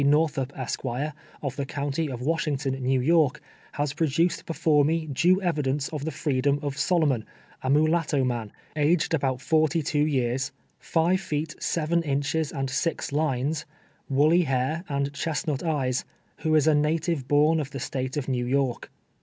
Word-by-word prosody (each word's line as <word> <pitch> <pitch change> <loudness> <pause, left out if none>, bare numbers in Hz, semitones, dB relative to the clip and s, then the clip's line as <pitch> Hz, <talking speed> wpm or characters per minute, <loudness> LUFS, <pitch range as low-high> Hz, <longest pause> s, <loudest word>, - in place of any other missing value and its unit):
Northiip, 145 -2 +2
Esquire, 130 +3 -3 0.3
of 135 -3 -3
the 140 - -1
county 145 +2 -2
of 125 -2 -5
Washington, 150 -3 0
New 130 +1 +2
York, 150 0 +3 0.3
has 145 -1 -1
produced 165 +2 0
before 155 -3 +3
me 160 +2 +1
due 170 +6 +3
evidence 145 -5 0
of 150 -2 -5
the - - -1
fi'eedom 140 -2 +1
of 140 -1 -2
Solomon, 150 -8 +2 0.4
a - - -4
inuhitto 155 -1 +3
man, 120 -4 -2 0.2
aged 155 +3 +2
about 135 -4 0
forty 155 +1 +2
two 150 0 +1
years, 130 -3 0 0.3
five 175 +3 +1
feet, 155 -3 -3
seven 170 +1 +1
inches 145 +1 -1
and 135 -2 -2
six 165 +5 -1
lines, 150 +1 0 0.4
woolly 150 +6 +4
hair, 135 +2 0
and 140 0 -1
chestnut 145 -1 -2
eyes, 135 -7 0 0.3
who 155 -1 +1
is 155 - +4
a 155 - +5
native 150 -1 0
born 150 +3 +4
of 145 -2 -3
the 135 - -6
State 130 +2 -3
of 145 - -2
New 125 -2 -1
York. 130 -2 0
145 Hz, 160 wpm, -26 LUFS, 135-160 Hz, 0.4 s, a